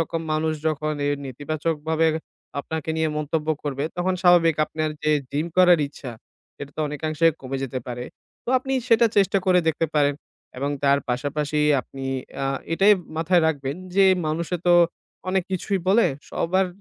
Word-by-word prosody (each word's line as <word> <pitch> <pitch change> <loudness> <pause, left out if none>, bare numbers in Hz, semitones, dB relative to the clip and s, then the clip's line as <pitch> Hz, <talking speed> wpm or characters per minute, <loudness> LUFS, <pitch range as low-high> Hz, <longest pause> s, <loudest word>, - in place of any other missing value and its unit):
রকম 165 0 -2
মানুষ 155 +1 0 0.2
যখন 155 0 -2
এই 145 - +2
নেতিবাচকভাবে 155 +4 -1 0.5
আপনাকে 160 +1 -4
নিয়ে 160 0 +1
মন্তব্য 150 +1 -2
করবে, 140 -1 -2
তখন 180 +1 0
স্বাভাবিক 175 -3 +5
আপনার 155 0 -3
যে 155 - +2 0.2
gym 150 +3 -1
করার 180 -2 +6
ইচ্ছা, 140 -2 -9 0.5
সেটা 140 -1 -8
তো - - -2
অনেকাংশে 155 +2 0
কমে 135 0 -4
যেতে 130 -1 -3
পারে। 125 0 -5 0.4
তো - - -11
আপনি 270 +1 -5 0.2
সেটা 230 0 +5
চেষ্টা 195 0 +4
করে 185 -1 +5
দেখতে 160 +1 0
পারেন, 145 -1 +3 0.4
এবং 140 +2 -1
তার 140 0 +4
পাশাপাশি 145 +4 -1 0.2
আপনি 135 +1 -9 0.4
আ - - 0 0.3
এটাই 195 +5 +5 0.2
মাথায় 165 +2 +3
রাখবেন 140 -2 -2 0.2
যে, 195 0 +5 0.2
মানুষে 165 +3 -1
তো 175 - +6 0.5
অনেক 190 0 +1
কিছুই 190 +2 -1
বলে। 220 +4 +5 0.2
সবার 185 +3 +1
155 Hz, 155 wpm, -23 LUFS, 145-175 Hz, 0.5 s, করার